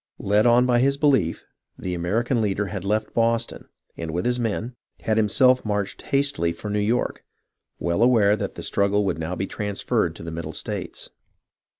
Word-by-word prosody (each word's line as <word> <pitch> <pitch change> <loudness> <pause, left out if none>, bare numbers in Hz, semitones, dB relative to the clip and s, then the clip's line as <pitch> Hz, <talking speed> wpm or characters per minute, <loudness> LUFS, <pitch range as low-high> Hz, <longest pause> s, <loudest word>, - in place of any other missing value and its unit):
Led 105 +3 +2
on 120 +1 +5
by 120 -1 +3
his 140 +2 +2
belief, 135 - +2 0.3
the 90 - -4
American 110 +8 0
leader 105 -1 0
had 95 -1 -5
left 105 +2 -1
Boston, 115 0 0 0.3
and, 80 -1 -5
with 85 +3 -2
his 125 0 +1
men, 115 +1 -2 0.3
had 110 - 0
himself 125 +4 +4
marched 105 -2 -2
hastily 140 -11 0
for 105 +4 -6
New 105 - 0
York, 110 +4 0 0.5
well 85 +4 -1
aware 110 -4 +5
that - - -4
the - - -7
struggle 100 +1 +1
would 90 -5 -1
now 80 +3 -3
be 95 - -2
transferred 105 -1 -1
to - - -10
the 85 - -6
Middle 80 -1 -5
States. - - -5
105 Hz, 180 wpm, -24 LUFS, 95-120 Hz, 0.5 s, on